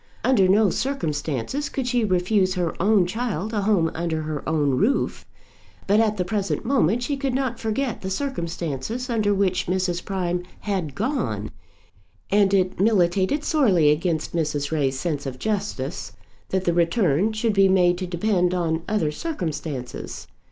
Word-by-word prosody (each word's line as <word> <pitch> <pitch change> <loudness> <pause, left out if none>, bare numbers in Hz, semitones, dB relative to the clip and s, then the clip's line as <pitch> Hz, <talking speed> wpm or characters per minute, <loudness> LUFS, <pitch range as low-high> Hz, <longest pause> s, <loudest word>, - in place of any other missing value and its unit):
Under 220 -8 +4
no 200 0 +4
circumstances 165 - -2
could 265 - -3
she 245 -2 +1
refuse 185 0 +2
her 175 -3 -1
own 200 -1 +4
child 220 0 -3
a 210 - 0
home 195 -6 +2
under 160 -1 -2
her 155 -1 -3
own 150 -3 +2
roof. 205 - 0 0.6
But 205 +2 +3
at 215 -2 +2
the 180 - 0
present 200 +3 -2
moment 240 - +2
she 285 +3 -1
could 270 -2 -2
not 260 -3 -1
forget 230 +3 -2
the 190 - -4
circumstances 190 - -3
under 215 -3 +1
which 195 -2 +1
Mrs. 180 -1 -1
Prime 180 -2 -2 0.2
had 185 -9 -2
gone, 200 - -2 0.8
and 200 -1 +4
it 185 -2 +1
militated 195 - +2
sorely 195 - +4
against 160 +1 -1
Mrs. 150 -3 -1
Ray's 135 -4 0
sense 145 -4 -2
of 130 -1 -5
justice 195 - -3 0.4
that 190 0 -1
the 175 - +2
return 175 - +2
should 220 0 0
be 195 -1 +5
made 180 -2 +3
to 185 - -3
depend 180 0 +1
on 165 -2 0
other 195 -8 +1
circumstances. 155 - -5
185 Hz, 155 wpm, -23 LUFS, 165-220 Hz, 0.8 s, be